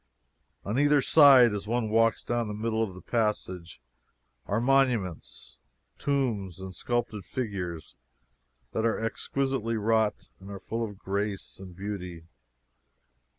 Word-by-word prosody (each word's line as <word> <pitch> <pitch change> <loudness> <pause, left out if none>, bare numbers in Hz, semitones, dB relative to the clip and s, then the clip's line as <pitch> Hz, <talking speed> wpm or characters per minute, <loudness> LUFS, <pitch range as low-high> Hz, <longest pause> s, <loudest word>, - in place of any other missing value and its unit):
On 110 +6 -1
either 145 0 +4
side, 135 -5 +7
as 105 0 -4
one 120 0 0
walks 115 +1 +2
down 120 -1 -1
the 105 - -4
middle 110 +1 -1
of 100 -5 -2
the 90 - -12
passage, 95 - -2 0.7
are 105 - 0
monuments, 125 -8 0 0.4
tombs, 115 - -1
and 95 0 -7
sculptured 115 0 -2
figures 90 - -5 0.8
that 110 - -1
are 115 -1 +1
exquisitely 115 +1 -1
wrought 110 0 0
and 95 +1 -12
are 100 -1 -7
full 115 +3 -3
of 105 -3 -6
grace 100 0 -4
and 95 -2 -10
beauty. 90 -4 -6
110 Hz, 130 wpm, -28 LUFS, 95-120 Hz, 0.8 s, side